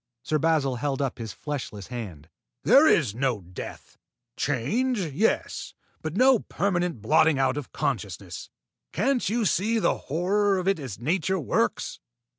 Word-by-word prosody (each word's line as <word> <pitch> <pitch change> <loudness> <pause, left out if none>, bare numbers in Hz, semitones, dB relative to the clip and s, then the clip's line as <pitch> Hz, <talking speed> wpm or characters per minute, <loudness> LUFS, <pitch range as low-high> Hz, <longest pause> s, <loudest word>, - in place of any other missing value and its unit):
Sir 155 - 0
Basil 145 -5 +2
held 135 +1 -2
up 135 -3 -2
his 110 -2 -5
fleshless 125 -9 -6
hand. 95 -12 -7 0.4
"There 295 +3 +7
is 135 - +3
no 125 -3 0
death! 90 0 -9 0.4
Change, 215 - 0
yes; 180 +4 -1 0.3
but 155 +4 -4
no 255 -1 +6
permanent 175 - -1
blotting 155 +6 +4
out 135 -1 +2
of 145 -3 -6
consciousness. 140 - -4 0.4
Can't 260 -6 +1
you 230 +1 0
see 215 +4 +2
the 220 - +1
horror 195 +6 +2
of 185 0 -2
it 195 -4 +2
as 130 -9 -6
nature 180 - 0
works? 145 - -1
155 Hz, 145 wpm, -26 LUFS, 125-195 Hz, 0.4 s, There